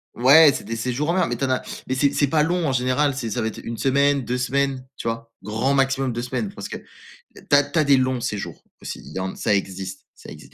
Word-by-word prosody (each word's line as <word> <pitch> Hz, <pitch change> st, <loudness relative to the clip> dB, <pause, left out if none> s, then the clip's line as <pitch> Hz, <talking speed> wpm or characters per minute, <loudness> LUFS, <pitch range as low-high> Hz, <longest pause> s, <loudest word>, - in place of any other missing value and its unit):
Ouais, 140 Hz, +5 st, +7 dB
c'est -, -, -5 dB
des 115 Hz, +2 st, -5 dB
séjours 125 Hz, +6 st, -2 dB
en 170 Hz, -, +2 dB
mer, 185 Hz, -2 st, +2 dB
mais 120 Hz, -, -2 dB
tu 130 Hz, -, -5 dB
en 135 Hz, -, +1 dB
as 130 Hz, -, +1 dB, 0.3 s
mais 130 Hz, -, -1 dB
c'est 140 Hz, +1 st, +2 dB
c'est 145 Hz, -, +2 dB
pas 150 Hz, +2 st, +2 dB
long, 170 Hz, 0 st, +1 dB
en -, -, +1 dB
général, 130 Hz, +3 st, +1 dB
c'est 125 Hz, -4 st, -3 dB
ça -, -, -2 dB
va 110 Hz, -, -1 dB
être 110 Hz, -, -6 dB
1 115 Hz, -, -5 dB
semaine, 140 Hz, +1 st, +2 dB
2 125 Hz, +1 st, -2 dB
semaines, 130 Hz, +1 st, -1 dB
tu 115 Hz, -, -3 dB
vois? 115 Hz, 0 st, -6 dB
Grand 110 Hz, +7 st, 0 dB
maximum 135 Hz, -2 st, +1 dB
2 120 Hz, -, -3 dB
semaines 125 Hz, -4 st, -3 dB
parce -, -, -7 dB
que, -, -, -5 dB, 0.6 s
tu -, -, -15 dB
as 145 Hz, -, +6 dB
tu 145 Hz, +3 st, -1 dB
as 155 Hz, -, +4 dB
des 140 Hz, -, +6 dB
longs 130 Hz, -1 st, +1 dB
séjours 105 Hz, -3 st, -4 dB, 0.2 s
aussi. -, -, -6 dB
Il -, -, -11 dB
y -, -, -2 dB
en 95 Hz, 0 st, -4 dB
ça 105 Hz, -, +1 dB
existe, 95 Hz, -1 st, -4 dB
ça -, -, -13 dB
existe, -, -, -13 dB
130 Hz, 275 wpm, -22 LUFS, 115-140 Hz, 0.6 s, Ouais